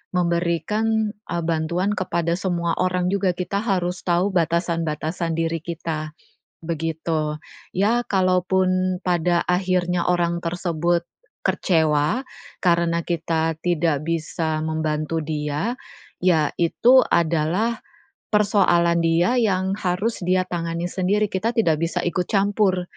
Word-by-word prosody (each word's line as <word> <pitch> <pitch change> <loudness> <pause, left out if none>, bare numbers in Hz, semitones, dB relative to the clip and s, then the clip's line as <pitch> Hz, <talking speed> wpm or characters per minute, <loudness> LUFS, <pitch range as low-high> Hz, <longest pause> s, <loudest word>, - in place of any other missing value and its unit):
memberikan, 180 +6 0 0.2
eee, 170 -1 -2
bantuan 170 +4 0
kepada 170 -2 -1
semua 175 -2 -1
orang 180 0 +1
juga. 195 -2 +1
Kita 185 +2 -2
harus 185 -4 -1
tahu 180 +3 +1
batasan-batasan 165 -1 -1
diri 165 0 -1
kita, 155 -2 -5 0.5
begitu. 160 -1 -2 0.3
Iya 225 +6 +1
kalaupun 185 -1 +1
pada 175 -1 +1
akhirnya 180 -1 +1
orang 170 -1 0
tersebut 170 0 0 0.4
kecewa 160 - +1 0.4
karena 170 -1 +2
kita 165 -1 -1
tidak 160 -4 +1
bisa 160 -1 -2
membantu 155 0 -2
dia, 150 +7 -2 0.5
iya 165 -5 +2
itu 245 +10 +5
adalah 170 +8 +1 0.5
persoalan 185 -5 +3
dia 170 +8 +2
yang 190 -4 +1
harus 195 +5 -1
dia 185 0 +3
tangani 170 -1 -3
sendiri, 200 +3 0
kita 225 +5 -1
tidak 165 -10 +2
bisa 170 +2 -1
ikut 175 +1 -1
campur, 195 -2 +1
175 Hz, 110 wpm, -22 LUFS, 165-185 Hz, 0.5 s, itu